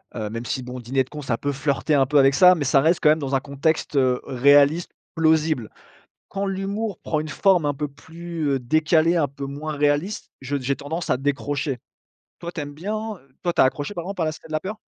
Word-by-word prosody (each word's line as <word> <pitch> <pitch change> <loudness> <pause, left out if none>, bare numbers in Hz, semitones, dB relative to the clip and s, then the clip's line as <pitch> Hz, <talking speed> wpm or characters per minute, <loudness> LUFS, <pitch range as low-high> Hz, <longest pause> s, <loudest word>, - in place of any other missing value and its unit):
heu, 110 -2 -3
même 115 +2 -5
si 130 - -2
bon, 125 0 -7
Diner 130 +3 0
de - - -25
Cons 150 0 -7
ça 120 -4 -1
peut 145 0 -2
flirter 140 +2 -1
un 135 -2 +4
peu 145 +2 +1
avec 135 0 +5
ça 180 +2 +8
mais 145 -4 -2
ça 135 +1 +4
reste 165 +3 +3
quand 150 - +5
même 155 +1 +4
dans 135 -1 -1
un - - +3
contexte, 145 +2 -1
heu, 130 -2 +3
réaliste, 145 +5 +4 0.2
plausible. 155 -6 +2 0.6
Quand 200 0 -3
l'humour 195 +1 -3
prend 155 - -1
une 155 - -4
forme 180 +2 +3
un 145 - +1
peu 150 +2 -3
plus, 165 +2 -6
heu, 135 -1 +1
décalée, 155 +6 +2
un 145 -3 +2
peu 140 +1 -7
moins 150 +3 -5
réaliste, 145 +8 0
je 135 +2 -3
j'ai 135 +1 -1
tendance 160 +4 -5
à - - +2
décrocher. 140 -1 -2 0.6
Toi 170 0 -6
tu 160 - -5
aimes 145 0 -7
bien 200 +8 -3 0.2
heu, 135 -3 -26
toi 175 - 0
tu - - +3
as - - +7
accroché 145 +8 -2
par 170 - -4
exemple 195 -2 -4
à - - +1
La 155 - 0
Cité 155 - -12
de 160 - -9
la 155 - +1
Peur? 210 +3 -5
145 Hz, 245 wpm, -23 LUFS, 135-165 Hz, 0.6 s, ça